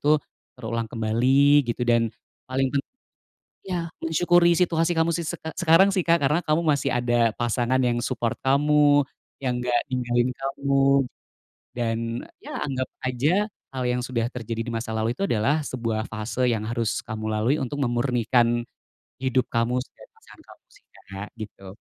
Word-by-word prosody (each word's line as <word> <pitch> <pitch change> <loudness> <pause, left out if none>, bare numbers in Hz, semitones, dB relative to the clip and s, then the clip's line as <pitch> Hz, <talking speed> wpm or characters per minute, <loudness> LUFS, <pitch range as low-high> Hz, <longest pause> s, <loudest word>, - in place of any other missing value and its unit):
tuh 150 +1 +4 0.4
terulang 115 0 -3
kembali 130 +6 +3
gitu 120 +1 -2
dan 115 -1 +3 0.4
paling 130 +1 +1
pen 140 - +2 0.8
iya, 180 -3 -2 0.2
mensyukuri 170 +1 +4
situasi 165 -1 +2
kamu 165 +1 +3
sise 170 -2 -3 0.2
sekarang 180 +2 +5
sih 185 - +1
Kak, 170 0 +3
karena 150 +4 +2
kamu 155 +2 +1
masih 140 -2 +2
ada 120 -2 +2
pasangan 120 +2 +1
yang 120 -2 +1
support 115 -1 -1
kamu, 145 +1 +4 0.4
yang 125 -2 -1
nggak 120 -1 +2
ninggalin 120 -1 0
kamu. 140 0 0 0.9
Dan, 115 -2 -1 0.4
ya - - -7
anggap 130 -2 -2 0.2
aja 145 - +1 0.3
hal 130 - -2
yang 125 0 +1
sudah 120 -2 -1
terjadi 115 -2 -4
di 120 - -4
masa 115 0 -3
lalu 110 +1 0
itu 195 +10 -2
adalah 115 +8 +2
sebuah 115 -3 -2
fase 110 +3 -2
yang 110 -3 -1
harus 115 -1 -2
kamu 110 0 -5
lalui 110 +6 +1
untuk 135 +2 -3
memurnikan 120 -2 +1 0.5
hidup 130 -1 +1
kamu 115 +1 +1
dan - - -18
pasangan - - -18
kamu - - -17
sih - - -22 0.3
Kak, 100 +2 -6
gitu. 105 -3 -9
125 Hz, 155 wpm, -24 LUFS, 115-145 Hz, 0.9 s, sekarang